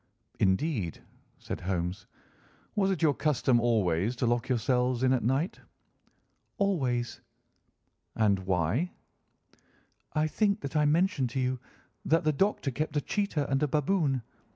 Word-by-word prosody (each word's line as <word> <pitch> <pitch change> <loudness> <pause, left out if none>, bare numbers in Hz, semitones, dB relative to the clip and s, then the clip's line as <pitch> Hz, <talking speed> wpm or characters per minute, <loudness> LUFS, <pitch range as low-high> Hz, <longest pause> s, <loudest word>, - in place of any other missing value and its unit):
"Indeed," 95 - 0 0.3
said - - -6
Holmes. 90 0 -3 0.7
"Was 195 -2 +2
it 185 -4 -1
your 150 -3 +5
custom 135 -5 +2
always 110 -2 +1
to 125 - -1
lock 120 0 0
yourselves 125 +1 +1
in 130 0 +4
at 130 - +1
night?" 135 - 0 1.0
"Always." 130 - 0 0.9
"And 105 -3 +3
why?" 95 - 0 1.2
"I 155 0 +2
think 205 +6 +1
that 140 - -6
I 150 -1 +4
mentioned 150 -4 +2
to 130 - -3
you 130 0 0 0.4
that 165 +3 +2
the 155 0 +2
Doctor 190 -4 +1
kept 150 +3 -2
a - - +2
cheetah 185 -9 -1
and 135 0 0
a 150 - +3
baboon. 145 -3 +1
135 Hz, 135 wpm, -29 LUFS, 120-155 Hz, 1.2 s, your